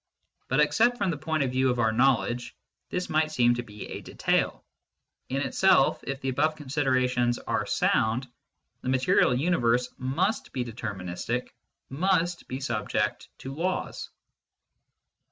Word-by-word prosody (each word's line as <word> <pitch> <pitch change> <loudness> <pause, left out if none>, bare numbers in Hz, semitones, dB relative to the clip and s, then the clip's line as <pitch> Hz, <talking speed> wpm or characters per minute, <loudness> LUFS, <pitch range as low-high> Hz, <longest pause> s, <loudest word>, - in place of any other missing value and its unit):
But 135 - +1
except 225 +12 +3
from 200 -5 0
the 155 - -3
point 155 0 -1
of 130 - -1
view 130 +1 +2
of 125 - 0
our 110 -2 +2
knowledge, 120 0 +1 0.3
this 180 0 -2
might 155 0 +1
seem 120 -5 +4
to 120 - -2
be 105 -3 -9
a - - -6
detail: - - -1 0.6
in 135 +1 -1
itself, 190 -6 +3
if 135 0 -4
the 135 - -1
above 155 +4 +1
considerations 130 -4 +1
are - - -2
sound, 115 +4 +1 0.5
the - - -3
material 130 -1 +3
universe 125 -5 +1
must 180 - -1
be 125 -2 -2
deterministic, 110 0 -4 0.4
must 175 +3 0
be 130 - -4
subject 120 -6 -2
to 135 - -7
laws. 180 +5 -3
130 Hz, 140 wpm, -27 LUFS, 120-155 Hz, 0.6 s, seem